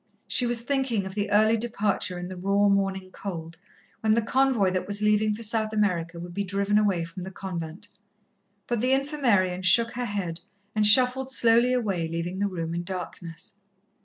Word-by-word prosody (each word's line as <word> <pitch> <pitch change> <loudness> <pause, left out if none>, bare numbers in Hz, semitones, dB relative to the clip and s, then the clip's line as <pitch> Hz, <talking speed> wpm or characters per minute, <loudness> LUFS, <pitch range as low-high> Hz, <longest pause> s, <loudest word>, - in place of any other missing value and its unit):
She 245 - +3
was 240 -1 0
thinking 260 -5 -1
of 190 - -6
the 205 0 -2
early 215 +2 +4
departure 210 -5 -1
in 175 0 -5
the 185 - -7
raw 200 +3 +1
morning 195 -1 0
cold, 165 -5 -7 0.4
when 220 -1 +2
the 230 - +2
convoy 255 -6 +2
that 185 0 -2
was 205 +1 -2
leaving 210 0 +2
for 230 - -8
South 220 0 0
America 175 -5 -1
would 175 +1 -8
be 200 - -2
driven 200 +2 +1
away 190 -5 +1
from 175 +3 -9
the 185 - -6
convent. 175 -3 -7 0.8
But 240 -3 -2
the 255 +2 +2
Infirmarian 245 -11 +1
shook 230 +5 +4
her 245 0 -3
head 190 -6 -4 0.3
and 215 -1 +3
shuffled 255 +4 +5
slowly 235 -1 +4
away, 200 -10 -1
leaving 170 +3 -4
the 205 - +1
room 165 -4 -4
in 170 - -2
darkness. 175 0 -8
200 Hz, 185 wpm, -26 LUFS, 180-230 Hz, 0.8 s, shuffled